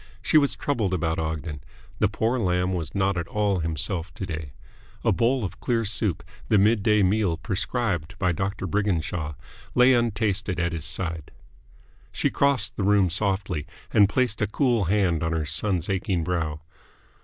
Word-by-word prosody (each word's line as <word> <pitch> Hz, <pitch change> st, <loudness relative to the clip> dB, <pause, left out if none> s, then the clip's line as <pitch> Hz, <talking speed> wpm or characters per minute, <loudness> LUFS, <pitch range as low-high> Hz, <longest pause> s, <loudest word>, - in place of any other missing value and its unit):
She 155 Hz, -, +5 dB
was 140 Hz, -2 st, +1 dB
troubled 110 Hz, -10 st, -1 dB
about 80 Hz, -2 st, -1 dB
Ogden. 80 Hz, -1 st, -4 dB, 0.4 s
The 105 Hz, -, +4 dB
poor 110 Hz, +5 st, 0 dB
lamb 90 Hz, -2 st, +1 dB
was 85 Hz, -5 st, -4 dB
not 95 Hz, -1 st, +1 dB
at 85 Hz, -, -4 dB
all 100 Hz, -2 st, 0 dB
himself 85 Hz, +2 st, -2 dB
to 95 Hz, -, -4 dB
day. 80 Hz, -6 st, -6 dB, 0.5 s
A -, -, +3 dB
bowl 125 Hz, +1 st, +2 dB
of 95 Hz, -, -6 dB
clear 115 Hz, -2 st, 0 dB
soup, 105 Hz, -3 st, -1 dB, 0.3 s
the 105 Hz, -, +5 dB
midday 105 Hz, 0 st, +4 dB
meal 95 Hz, -3 st, +2 dB
prescribed 95 Hz, -, -2 dB
by 90 Hz, -2 st, +1 dB
Doctor 95 Hz, +3 st, -3 dB
Briginshaw, 85 Hz, -7 st, -1 dB, 0.4 s
lay 125 Hz, +1 st, +6 dB
untasted 105 Hz, -5 st, 0 dB
at 85 Hz, 0 st, 0 dB
his 80 Hz, -2 st, -4 dB
side. 80 Hz, -2 st, -2 dB, 0.8 s
She -, -, 0 dB
crossed 140 Hz, -3 st, +2 dB
the 100 Hz, -, -1 dB
room 100 Hz, -3 st, +3 dB
softly, 95 Hz, -4 st, -1 dB, 0.3 s
and 100 Hz, -3 st, +6 dB
placed 125 Hz, -3 st, 0 dB
a 105 Hz, -, +2 dB
cool 120 Hz, -3 st, +1 dB
hand 90 Hz, -3 st, +1 dB
on 80 Hz, 0 st, -1 dB
her 80 Hz, -2 st, -1 dB
son's 90 Hz, +1 st, -1 dB
aching 95 Hz, -3 st, -1 dB
brow. 80 Hz, -3 st, -2 dB
95 Hz, 165 wpm, -25 LUFS, 85-105 Hz, 0.8 s, lay